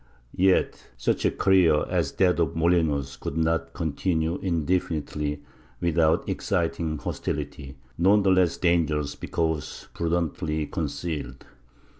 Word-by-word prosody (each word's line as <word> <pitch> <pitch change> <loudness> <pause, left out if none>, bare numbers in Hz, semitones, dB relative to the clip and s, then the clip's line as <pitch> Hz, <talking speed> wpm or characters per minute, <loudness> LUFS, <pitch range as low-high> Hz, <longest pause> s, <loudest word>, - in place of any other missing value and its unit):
Yet 95 0 +2
such - - 0
a - - +5
career 90 -6 +3
as 85 -6 -1
that 90 -2 +2
of 80 -3 0
Molinos 80 -5 +1
could 75 - -4
not 80 0 0
continue 80 +1 -1
indefinitely 75 -4 -1 0.4
without 80 -2 +2
exciting 80 -3 -1
hostility, 70 -1 -5 0.2
none 100 +4 +5
the 95 - +4
less 90 -2 +3
dangerous 75 -5 +1
because 80 -2 -3
prudently 80 -2 -1
concealed. 75 -6 -4
80 Hz, 110 wpm, -26 LUFS, 75-90 Hz, 0.4 s, a